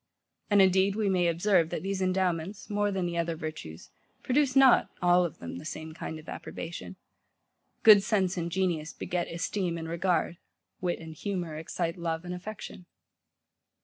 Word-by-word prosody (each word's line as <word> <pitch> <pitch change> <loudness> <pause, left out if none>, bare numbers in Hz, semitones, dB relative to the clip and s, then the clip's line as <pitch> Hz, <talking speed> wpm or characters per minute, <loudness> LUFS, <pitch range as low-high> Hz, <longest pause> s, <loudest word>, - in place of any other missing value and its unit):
And, 205 -2 +6
indeed, 190 +1 +3
we 210 -2 +1
may 180 -2 +2
observe, 170 0 +2
that - - -4
these 195 0 -2
endowments, 185 +1 -1
more 205 0 +1
than 190 -2 -1
the 170 -1 -2
other 165 0 -1
virtues, 155 - -7 0.3
produce 270 0 +2
not, 270 -2 +6
all 180 0 +4
of 170 - -6
them, 85 0 -7
the - - -10
same 160 0 -6
kind 160 - -6
of 155 - -13
approbation. 170 +3 -7 0.9
Good 210 -2 +9
sense 195 -4 +1
and 170 -1 -3
genius 170 -4 -1
beget 175 -1 -3
esteem 175 +1 -2
and 165 -1 -5
regard: 170 0 0 0.4
wit 180 -1 -1
and 160 -1 -9
humour 180 -4 -3
excite 165 +2 -3
love 165 0 -3
and 180 - -4
affection. 185 -1 -8
180 Hz, 165 wpm, -29 LUFS, 165-195 Hz, 0.9 s, Good